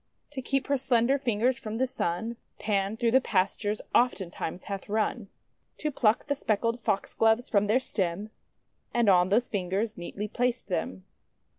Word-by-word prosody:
To 275 Hz, -2 st, -5 dB
keep 270 Hz, +1 st, 0 dB
her 280 Hz, -1 st, +1 dB
slender 255 Hz, +1 st, +2 dB
fingers 245 Hz, +1 st, +1 dB
from 220 Hz, -4 st, -5 dB
the 260 Hz, -, +2 dB
Sun, 225 Hz, 0 st, -2 dB, 0.2 s
Pan 205 Hz, 0 st, 0 dB
through 230 Hz, 0 st, +2 dB
the 260 Hz, +2 st, +5 dB
pastures 205 Hz, 0 st, 0 dB
oftentimes 190 Hz, -7 st, 0 dB
hath 200 Hz, 0 st, -6 dB
run, 215 Hz, +1 st, -1 dB, 0.5 s
to 305 Hz, -, -2 dB
pluck 225 Hz, -4 st, +2 dB
the 285 Hz, -, 0 dB
speckled 230 Hz, -2 st, 0 dB
Foxgloves 225 Hz, +3 st, +1 dB
from 205 Hz, -1 st, +3 dB
their 225 Hz, +5 st, +4 dB
stem, 200 Hz, -3 st, -2 dB, 0.6 s
and 235 Hz, -2 st, +3 dB
on 180 Hz, -1 st, +5 dB
those 235 Hz, +5 st, +3 dB
fingers 200 Hz, +2 st, -2 dB
neatly 200 Hz, +4 st, -5 dB
placed 245 Hz, +1 st, -1 dB
them. 95 Hz, -, -3 dB
220 Hz, 155 wpm, -28 LUFS, 200-245 Hz, 0.6 s, the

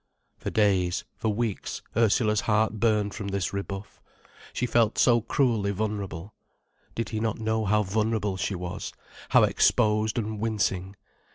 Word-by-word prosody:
For -, -, -5 dB
days, 95 Hz, -5 st, +2 dB
for 110 Hz, -, -1 dB
weeks, 110 Hz, -1 st, -3 dB
Ursula's 110 Hz, -1 st, +3 dB
heart 110 Hz, 0 st, +1 dB
burned 105 Hz, -3 st, +2 dB
from 105 Hz, -3 st, -5 dB
this 100 Hz, -2 st, -2 dB
rebuff. 100 Hz, 0 st, -6 dB, 0.5 s
She 125 Hz, -, -1 dB
felt 115 Hz, -2 st, +2 dB
so 120 Hz, -2 st, +4 dB
cruelly 115 Hz, -3 st, +1 dB
vulnerable. 100 Hz, -2 st, -3 dB, 0.6 s
Did 115 Hz, -2 st, -2 dB
he 110 Hz, -, -3 dB
not 110 Hz, -1 st, -1 dB
know 110 Hz, 0 st, -1 dB
how 105 Hz, +2 st, +3 dB
vulnerable 105 Hz, 0 st, 0 dB
she 95 Hz, +1 st, -2 dB
was, 90 Hz, 0 st, -5 dB, 0.4 s
how -, -, +6 dB
exposed 110 Hz, 0 st, +2 dB
and 110 Hz, -2 st, -2 dB
wincing? 100 Hz, -3 st, -1 dB
105 Hz, 145 wpm, -27 LUFS, 100-110 Hz, 0.6 s, how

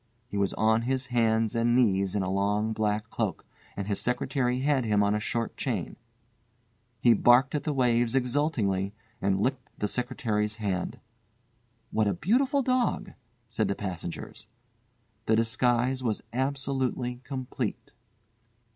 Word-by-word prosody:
He -, -, -7 dB
was 100 Hz, -1 st, 0 dB
on 110 Hz, +1 st, +3 dB
his 130 Hz, +2 st, -1 dB
hands 110 Hz, -2 st, +2 dB
and 115 Hz, +1 st, +2 dB
knees 100 Hz, -6 st, +2 dB
in 100 Hz, -, +1 dB
a 95 Hz, -, -2 dB
long 105 Hz, +3 st, +1 dB
black 105 Hz, 0 st, -1 dB
cloak, -, -, -2 dB, 0.3 s
and 100 Hz, -, -2 dB
his 100 Hz, -1 st, -1 dB
secretary 125 Hz, 0 st, 0 dB
had 140 Hz, -2 st, +2 dB
him 105 Hz, -2 st, +2 dB
on 100 Hz, 0 st, +2 dB
a 105 Hz, -, +1 dB
short 115 Hz, +2 st, -2 dB
chain. -, -, -2 dB, 1.0 s
He 120 Hz, +1 st, +6 dB
barked 120 Hz, +5 st, +5 dB
at 150 Hz, -, -2 dB
the 155 Hz, -, +1 dB
waves 120 Hz, -3 st, +2 dB
exultingly 120 Hz, -8 st, 0 dB, 0.3 s
and 95 Hz, -1 st, +1 dB
licked 130 Hz, 0 st, -2 dB
the 105 Hz, -, -1 dB
secretary's 110 Hz, -3 st, -1 dB
hand. 100 Hz, -4 st, -3 dB, 0.9 s
"What 110 Hz, -1 st, +2 dB
a 100 Hz, -, +1 dB
beautiful 265 Hz, -, +2 dB
dog," 250 Hz, -6 st, 0 dB, 0.4 s
said 110 Hz, -2 st, 0 dB
the 100 Hz, -, -1 dB
passengers. 90 Hz, -4 st, -6 dB, 0.8 s
The 110 Hz, -, +4 dB
disguise 120 Hz, +3 st, +2 dB
was 115 Hz, -4 st, -1 dB
absolutely 130 Hz, -2 st, -1 dB
complete. 130 Hz, -2 st, -4 dB
115 Hz, 140 wpm, -28 LUFS, 105-130 Hz, 1.0 s, He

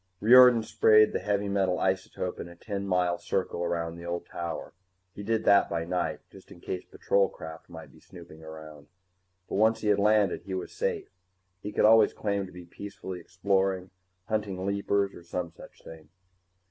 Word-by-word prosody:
Riordan 125 Hz, +1 st, +7 dB
sprayed 110 Hz, -1 st, +4 dB
the -, -, 0 dB
heavy 100 Hz, +1 st, -1 dB
metal 95 Hz, -2 st, +1 dB
isotope 95 Hz, -1 st, -2 dB
in -, -, -6 dB
a 85 Hz, -, -13 dB
ten 100 Hz, +1 st, -5 dB
mile 90 Hz, -2 st, +1 dB
circle 90 Hz, -2 st, -2 dB
around 85 Hz, -1 st, -2 dB
the 85 Hz, -, -10 dB
old 85 Hz, 0 st, -4 dB
tower. 85 Hz, -1 st, -6 dB, 0.4 s
He 100 Hz, -, -8 dB
did 110 Hz, +2 st, -1 dB
that 100 Hz, -1 st, +5 dB
by 85 Hz, -1 st, -2 dB
night, 90 Hz, 0 st, -2 dB
just -, -, -16 dB
in -, -, -13 dB
case 90 Hz, -, -5 dB
patrol 100 Hz, -1 st, 0 dB
craft 80 Hz, 0 st, -10 dB
might -, -, -11 dB
be -, -, -19 dB
snooping 85 Hz, -3 st, -14 dB
around. 80 Hz, -2 st, -11 dB, 0.6 s
But -, -, -3 dB
once 110 Hz, +1 st, +3 dB
he 105 Hz, -, 0 dB
had 100 Hz, -1 st, +3 dB
landed, 105 Hz, -2 st, +2 dB
he 95 Hz, -, -6 dB
was 95 Hz, -, -6 dB
safe 460 Hz, -4 st, -2 dB, 0.5 s
he 105 Hz, -, -5 dB
could 105 Hz, -, +2 dB
always 110 Hz, 0 st, +6 dB
claim 100 Hz, -2 st, -2 dB
to -, -, -14 dB
be 90 Hz, 0 st, -11 dB
peacefully 95 Hz, 0 st, -8 dB
exploring, 95 Hz, +1 st, -1 dB, 0.4 s
hunting 100 Hz, -4 st, -2 dB
leapers 100 Hz, 0 st, 0 dB
or -, -, -12 dB
some 85 Hz, 0 st, -5 dB
such -, -, -16 dB
thing. 80 Hz, -2 st, -12 dB
95 Hz, 185 wpm, -28 LUFS, 85-105 Hz, 0.6 s, Riordan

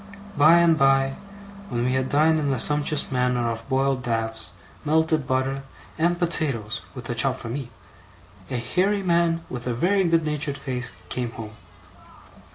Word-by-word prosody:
By 150 Hz, +3 st, +6 dB
and 170 Hz, -2 st, +4 dB
by, 135 Hz, 0 st, +3 dB, 0.5 s
when 120 Hz, 0 st, -1 dB
we 130 Hz, -, +1 dB
had 130 Hz, 0 st, 0 dB
dined 155 Hz, +2 st, +3 dB
in 145 Hz, -2 st, 0 dB
a 130 Hz, -, -2 dB
sumptuous 150 Hz, +1 st, +2 dB
manner 125 Hz, -2 st, +1 dB
off 115 Hz, +2 st, -5 dB
boiled 135 Hz, -1 st, +1 dB
dabs, 115 Hz, -3 st, -2 dB, 0.3 s
melted 155 Hz, -2 st, +1 dB
butter, 130 Hz, +1 st, -1 dB, 0.3 s
and 175 Hz, +2 st, +1 dB
potatoes, 145 Hz, -11 st, -1 dB
with 125 Hz, -2 st, -7 dB
a -, -, 0 dB
chop 125 Hz, +3 st, +1 dB
for 115 Hz, -, -8 dB
me, 130 Hz, +1 st, -5 dB, 0.8 s
a 125 Hz, -, -2 dB
hairy 195 Hz, -, 0 dB
man 170 Hz, -2 st, +1 dB
with 125 Hz, 0 st, -6 dB
a 120 Hz, -, -1 dB
very 190 Hz, +9 st, +2 dB
good 165 Hz, -1 st, +2 dB
natured 150 Hz, -2 st, -1 dB
face 125 Hz, -3 st, -3 dB, 0.2 s
came 120 Hz, -2 st, -3 dB
home. 110 Hz, -2 st, -8 dB
135 Hz, 165 wpm, -24 LUFS, 125-160 Hz, 0.8 s, By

